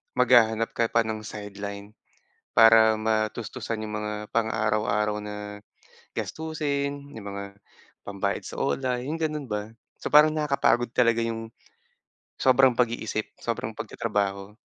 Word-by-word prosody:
maghahanap 115 Hz, -3 st, +4 dB
ka 115 Hz, -, +2 dB
pa 115 Hz, -, +3 dB
ng 110 Hz, -1 st, -4 dB
sideline, 100 Hz, -1 st, -7 dB, 0.7 s
para 115 Hz, -1 st, +7 dB
matustusan 110 Hz, +1 st, -2 dB
’yong 105 Hz, 0 st, -6 dB
mga 105 Hz, 0 st, -3 dB, 0.2 s
pang-araw-araw 105 Hz, -2 st, +1 dB
na, 105 Hz, 0 st, -7 dB, 0.6 s
gastusin, 145 Hz, -3 st, -3 dB
’yong 110 Hz, -2 st, -9 dB
mga 100 Hz, 0 st, -5 dB, 0.6 s
pambayad 100 Hz, -1 st, -2 dB
sa -, -, -7 dB
OLA, 125 Hz, -2 st, 0 dB
’yong 155 Hz, +4 st, -3 dB
gano'n 150 Hz, -2 st, -2 dB
ba? 105 Hz, 0 st, -3 dB, 0.3 s
So -, -, -3 dB
parang 150 Hz, +1 st, +7 dB
nakakapagod 140 Hz, -5 st, +2 dB
talaga 115 Hz, -2 st, +3 dB
’yong, 115 Hz, -1 st, -3 dB, 0.9 s
sobrang 130 Hz, 0 st, +5 dB
pag-iisip, 115 Hz, -3 st, -1 dB
sobrang -, -, -3 dB
pagtatrabaho. 100 Hz, +1 st, -3 dB
110 Hz, 120 wpm, -26 LUFS, 105-125 Hz, 0.9 s, para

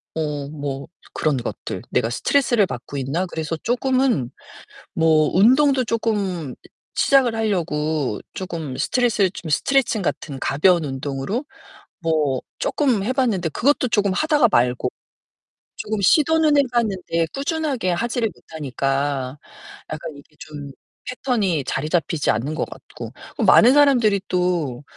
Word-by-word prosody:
어 150 Hz, -3 st, -3 dB
뭐 140 Hz, -2 st, -5 dB, 0.3 s
그런 155 Hz, -3 st, 0 dB
것들 120 Hz, -, -5 dB
'내가 115 Hz, -, +1 dB
스트레스를 240 Hz, -, +2 dB
받고 130 Hz, +3 st, -7 dB
있나?' 140 Hz, +7 st, -1 dB
그래서 160 Hz, -2 st, -4 dB
쪼끔은 250 Hz, -, +1 dB, 0.6 s
뭐 160 Hz, -2 st, +3 dB
운동도 260 Hz, +6 st, +4 dB
쪼끔 200 Hz, -, -2 dB, 0.4 s
시작을 260 Hz, -4 st, +3 dB
하려고 155 Hz, -, -1 dB
쪼금 165 Hz, -8 st, -5 dB
스트레스 220 Hz, -, +2 dB
좀 170 Hz, -4 st, -8 dB
스트레칭 265 Hz, -, +2 dB
같은 140 Hz, -5 st, -3 dB
가벼운 170 Hz, +4 st, +3 dB
운동으로 140 Hz, -, -3 dB, 0.6 s
뭐 155 Hz, -6 st, 0 dB, 0.2 s
쪼끔 255 Hz, -9 st, +1 dB
해 255 Hz, -, 0 dB
봤는데 225 Hz, -11 st, 0 dB
그것도 255 Hz, -, +1 dB
쪼금 205 Hz, -3 st, +1 dB
하다가 295 Hz, -, +3 dB
말고 125 Hz, -2 st, +2 dB, 0.9 s
쪼금 215 Hz, -1 st, -3 dB
시도는 310 Hz, -, +4 dB
해 -, -, +7 dB
봤는데 190 Hz, -8 st, 0 dB
꾸준하게 280 Hz, -, -1 dB
하지를 230 Hz, +4 st, -1 dB
못하니까 140 Hz, -2 st, -3 dB, 0.5 s
약간 155 Hz, 0 st, -5 dB
이게 145 Hz, +2 st, -18 dB
좀 145 Hz, -2 st, -9 dB, 0.4 s
패턴이 210 Hz, -, -1 dB
자리 150 Hz, +4 st, -2 dB
잡히지 160 Hz, -2 st, +1 dB
않는 130 Hz, +8 st, -2 dB
것 -, -, -1 dB
같고. -, -, -10 dB, 0.3 s
그 -, -, -2 dB
많은 245 Hz, +4 st, +7 dB
사람들이 245 Hz, -9 st, +4 dB
또 175 Hz, -8 st, -1 dB
180 Hz, 285 characters per minute, -21 LUFS, 145-240 Hz, 0.9 s, 해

